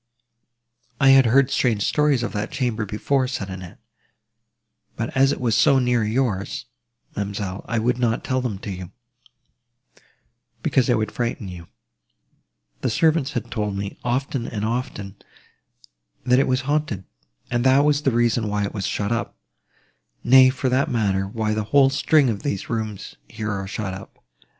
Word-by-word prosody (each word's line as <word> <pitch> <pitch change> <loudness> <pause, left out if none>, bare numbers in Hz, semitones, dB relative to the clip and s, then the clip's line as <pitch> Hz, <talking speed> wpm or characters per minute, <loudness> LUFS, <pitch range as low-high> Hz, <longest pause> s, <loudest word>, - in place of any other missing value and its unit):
"I 135 -2 +5
had 135 -2 +7
heard 135 +3 +4
strange 110 -5 +1
stories 150 -3 +2
of 120 - -3
that 105 +1 -3
chamber 120 -6 -2
before," 130 +6 0
said 100 -7 -4
Annette: 95 -1 -9 1.2
"but 115 +4 -4
as 135 +1 +4
it - - -3
was 120 -3 0
so 140 - +5
near 125 -3 +2
yours, 110 -3 -1 0.5
ma'amselle, 100 -1 -4
I 115 - -1
would 120 +2 0
not 120 -2 0
tell 130 0 -1
them 120 -6 -3
to 100 - -5
you, 90 -2 -7 1.7
because 130 -3 +2
they 120 - +3
would 110 -2 -1
frighten 120 -4 -3
you. 85 -2 -9 1.1
The - - -1
servants 155 -3 +2
had 120 -1 -4
told 105 -3 -2
me, 100 0 -5
often 125 0 -2
and 105 -1 -3
often, 110 -4 -4 1.1
that 125 0 +4
it 135 - +2
was 130 0 +1
haunted, 145 -8 -1 0.5
and 120 0 +1
that 135 +2 +5
was 150 -1 +2
the 140 - +2
reason 120 -2 +1
why 105 0 -1
it 100 - -3
was 100 -3 -3
shut 100 +1 -2
up: 115 - -2 0.9
nay, 130 +1 +7
for 130 0 -2
that 130 +5 +1
matter, 100 -6 0
why 110 +1 -2
the 105 -1 -2
whole 135 +4 +4
string 145 0 +3
of 105 -4 -2
these 100 -8 -3
rooms, 110 -3 -4
here, 110 -2 -4
are 95 -1 -4
shut 100 -1 -4
up. 95 - -12
115 Hz, 165 wpm, -22 LUFS, 105-130 Hz, 1.7 s, had